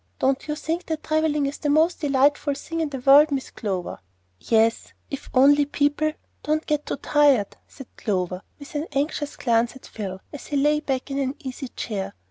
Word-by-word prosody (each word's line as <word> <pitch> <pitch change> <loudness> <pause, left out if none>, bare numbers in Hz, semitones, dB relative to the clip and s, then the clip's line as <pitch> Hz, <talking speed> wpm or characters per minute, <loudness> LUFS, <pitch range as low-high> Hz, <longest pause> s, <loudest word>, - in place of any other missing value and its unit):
Don't 265 +2 0
you 300 - -1
think 325 +3 -3
that 315 -1 -3
travelling 310 -2 +1
is 280 +1 -4
the 295 - -1
most 315 +4 +3
delightful 285 0 +2
thing 330 +4 -5
in 320 -2 0
the 275 - -5
world, 280 +4 +7
Miss 270 -2 -3
Clover?" 190 -5 -4 0.4
"Yes 225 0 +1 0.2
if 275 - -6
only 285 +3 +6
people 290 +2 +1 0.3
don't 310 +1 -1
get 300 -1 -1
too - - -1
tired," 285 -10 +3
said 270 - -11
Clover, 185 -3 -2 0.2
with 285 - -12
an 300 +2 -2
anxious 290 +1 -1
glance 235 0 +1
at 265 - -13
Phil, 190 -3 -6
as 290 - -8
he 290 - -1
lay 295 +2 +3
back 270 -2 -3
in 275 - -1
an 270 0 -1
easy 265 0 -6
chair. 205 -5 -5
280 Hz, 190 wpm, -24 LUFS, 255-300 Hz, 0.4 s, world